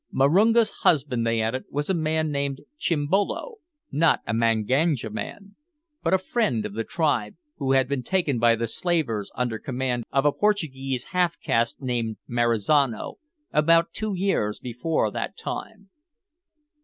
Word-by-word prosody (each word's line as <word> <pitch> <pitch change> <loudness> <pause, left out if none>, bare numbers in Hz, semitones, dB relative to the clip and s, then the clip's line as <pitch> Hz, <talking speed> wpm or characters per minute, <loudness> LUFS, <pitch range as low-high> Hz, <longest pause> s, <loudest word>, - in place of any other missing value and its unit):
Marunga's 210 - +4
husband, 130 -7 +2
they 115 0 +1
added, 115 +4 -2
was 145 +1 -2
a 190 - +1
man 160 -2 0
named 140 -1 -2 0.2
Chimbolo 190 - 0 0.3
not 160 +2 +3
a 105 - -2
Manganja 115 +3 +1
man, 200 - -7 0.5
but - - 0
a 190 - +5
friend 185 - 0
of 100 - -5
the 115 +2 -2
tribe 135 -9 0 0.2
who 135 -1 0
had 135 -1 +3
been 140 -1 -1
taken 155 -5 0
by 115 0 +5
the 115 +1 -2
slavers, 115 - -1
under 120 -3 -2
command 125 -2 -2
of 135 +1 +2
a 145 - +5
Portuguese 135 -11 -1
half 180 -2 +1
caste 115 +4 0
named 120 -4 -2
Marizano, 120 +2 +1 0.3
about 165 +2 +4
two 215 -2 -2
years 180 - 0
before 125 +7 -1
that - - -4
time. 200 -3 -7
140 Hz, 145 wpm, -25 LUFS, 115-170 Hz, 0.5 s, a